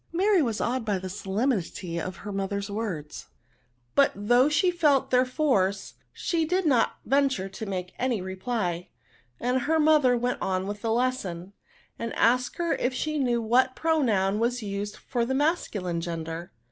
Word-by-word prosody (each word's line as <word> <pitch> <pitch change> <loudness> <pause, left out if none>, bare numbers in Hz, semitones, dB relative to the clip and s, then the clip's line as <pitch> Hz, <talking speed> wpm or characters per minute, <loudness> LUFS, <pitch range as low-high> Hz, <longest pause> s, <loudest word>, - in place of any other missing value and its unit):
'* - - -38
Mary 400 -3 +4
was 230 -6 -1
awed 250 +1 -1
by 210 -3 0
the 185 0 -6
solemnity 190 -4 -2
of 185 +2 -5
her 205 - -4
mother's 200 +1 -3
words; 185 -9 -5 0.7
but 280 -1 +5
though 245 +7 +3
she 355 +4 +3
felt 300 -6 +2
their 250 0 +4
force, 205 -9 0 0.2
she 335 -2 -1
did 360 +3 0
not 255 -7 +3
venture 270 -7 +2
to 195 +3 -7
make 185 -2 -4
any 245 -3 0
re 190 +1 -5
ply; 185 -5 -2 0.5
and 250 +1 0
her 320 +6 +1
mother 300 -5 +4
went 245 +1 -1
on 185 0 -1
with 205 +1 -5
the 225 - -1
lesson, 205 -7 -1 0.5
and 230 -1 -4
asked 250 +2 +2
her 340 -1 0
if 255 +1 -1
she 305 +3 -1
knew 245 -3 +1
what 255 +3 +3
pronoun 220 -12 +1
was 240 +1 0
used 205 +1 -4
for 240 -2 -2
the 260 +3 -1
masculine 210 - 0
gender? 165 0 -5
230 Hz, 170 wpm, -27 LUFS, 195-265 Hz, 0.7 s, but